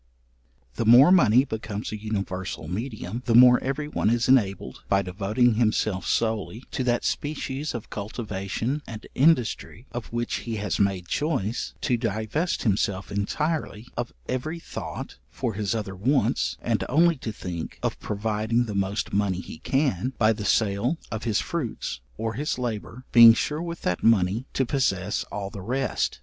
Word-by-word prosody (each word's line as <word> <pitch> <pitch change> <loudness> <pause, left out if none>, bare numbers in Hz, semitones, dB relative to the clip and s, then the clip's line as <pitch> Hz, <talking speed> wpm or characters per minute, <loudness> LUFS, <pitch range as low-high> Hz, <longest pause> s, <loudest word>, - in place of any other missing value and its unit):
The 115 - 0
more 125 +8 +8
money 130 - +6
becomes 110 -3 -5
a - - -3
universal 100 -6 -4
medium, 110 - -4
the 115 - +3
more 125 0 +8
every 140 +3 -2
one 150 - 0
is 120 0 +1
enabled, 100 - +2
by 100 0 +3
devoting 105 +6 +1
himself 110 -4 +1
solely 110 +1 -1
to 130 - -2
that 120 -1 +1
species 145 -1 -2
of 115 - -7
cultivation 105 +5 -3
and 110 -1 -8
industry, 130 -5 +1
of 120 -2 -5
which 120 0 -1
he 115 -2 -4
has 105 -2 -2
made 95 -3 +1
choice, 130 - -1
to 125 - +1
divest 115 - -1
himself 100 -3 0
entirely 120 +2 -2
of 120 0 -3 0.2
every 140 +6 -2
thought 165 - -7
for 120 - -3
his 105 +1 -1
other 100 -3 -4
wants, 130 +9 +1
and - - 0
only 165 +5 +4
to 115 - -5
think 85 -5 -6
of - - -1
providing 110 +3 0
the 105 - -5
most 100 +1 -1
money 100 -2 +1
he 80 - -9
can, 130 - 0
by 110 0 +4
the 105 -1 -6
sale 110 +9 +1
of 110 +1 -4
his 110 -3 +1
fruits 150 - -4 0.2
or 115 0 -2
his 145 +5 -2
labour, 120 +1 -5
being 115 -1 +10
sure 150 +5 -1
with 170 0 -6
that 90 - 0
money 110 +2 +3
to 135 - +1
possess 110 -9 0
all 100 -1 -5
the 100 - -7
rest. 130 +7 -1
115 Hz, 160 wpm, -25 LUFS, 100-130 Hz, 0.2 s, being